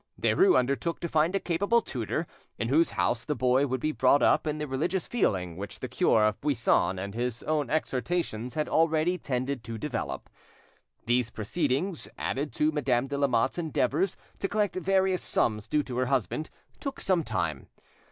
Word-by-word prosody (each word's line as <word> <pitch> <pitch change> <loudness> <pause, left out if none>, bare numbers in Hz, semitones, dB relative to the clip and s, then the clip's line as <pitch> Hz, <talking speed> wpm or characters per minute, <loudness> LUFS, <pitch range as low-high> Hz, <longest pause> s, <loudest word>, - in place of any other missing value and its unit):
Derues 380 0 +4
undertook 140 +6 0
to 170 - -1
find 160 +3 +2
a - - +2
capable 200 +8 +2
tutor, 135 - -3 0.3
in 115 - -2
whose 160 +5 +4
house 110 +6 0
the 150 - -2
boy 130 +2 +2
would 130 0 -1
be 155 +5 0
brought 140 0 +3
up - - +3
in 150 0 -1
the 150 - -3
religious 160 +7 -1
feeling 90 - 0
which 100 +2 -7
the - - -4
cure 110 -1 +3
of 105 -2 0
Buisson 120 -8 +2
and 100 +2 -5
his 120 +1 -3
own 150 -2 0
exhortations 130 -4 -2
had 155 -1 0
already 165 +2 +2
tended 130 -2 -2
to 115 -1 -5
develop. 120 -2 -4 0.8
These 120 0 +2
proceedings, 145 - -1
added 145 +2 -2
to 150 +1 +2
Madame 135 -5 +1
de 140 +1 -4
Lamotte's 130 +2 +1
endeavours 160 +2 0 0.2
to 195 - 0
collect 205 -1 0
various 190 0 +1
sums 105 -2 +1
due 150 -1 +1
to 125 -3 -6
her 130 0 +1
husband, 135 +4 -1 0.3
took 275 -2 -5
some 180 -3 +1
time. - - -2
145 Hz, 175 wpm, -28 LUFS, 120-165 Hz, 0.8 s, Derues